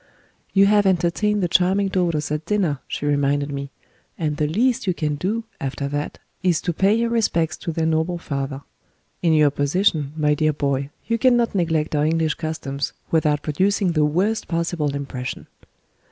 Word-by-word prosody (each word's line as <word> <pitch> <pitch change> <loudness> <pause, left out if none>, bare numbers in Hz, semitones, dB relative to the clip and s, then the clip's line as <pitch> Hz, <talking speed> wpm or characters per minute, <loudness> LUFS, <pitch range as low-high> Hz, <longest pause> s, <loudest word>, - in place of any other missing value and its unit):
"You 195 0 +5
have 205 0 +4
entertained 190 +3 +1
the - - +2
charming 185 +3 +3
daughters 170 -6 0
at 150 +2 -3
dinner," 185 -10 +1
she - - -4
reminded 145 0 +1
me; 140 0 -4 0.5
"and 155 -3 -1
the 150 - +1
least 230 +7 +1
you 180 - +1
can 150 -3 -1
do, 200 +10 -2 0.2
after 140 +1 -3
that, 145 +1 -3 0.2
is 180 -4 +2
to 175 - -1
pay 195 +5 +3
your 230 0 0
respects 170 -8 +1
to 170 - -4
their 160 0 -1
noble 160 +2 0
father. 140 -3 -4 0.6
In 170 - +3
your 150 -2 +5
position, 145 0 +1
my 150 -1 +3
dear 155 +1 +1
boy, 140 -1 -1 0.2
you 230 0 0
cannot 240 -1 +3
neglect 160 -5 0
our 145 0 +2
English 160 -1 +1
customs 145 -4 -4 0.2
without 150 -2 +2
producing 185 +4 +1
the 155 -2 +2
worst 190 +9 0
possible 165 -4 -1
impression." 135 -2 -5
160 Hz, 170 wpm, -22 LUFS, 145-190 Hz, 0.6 s, You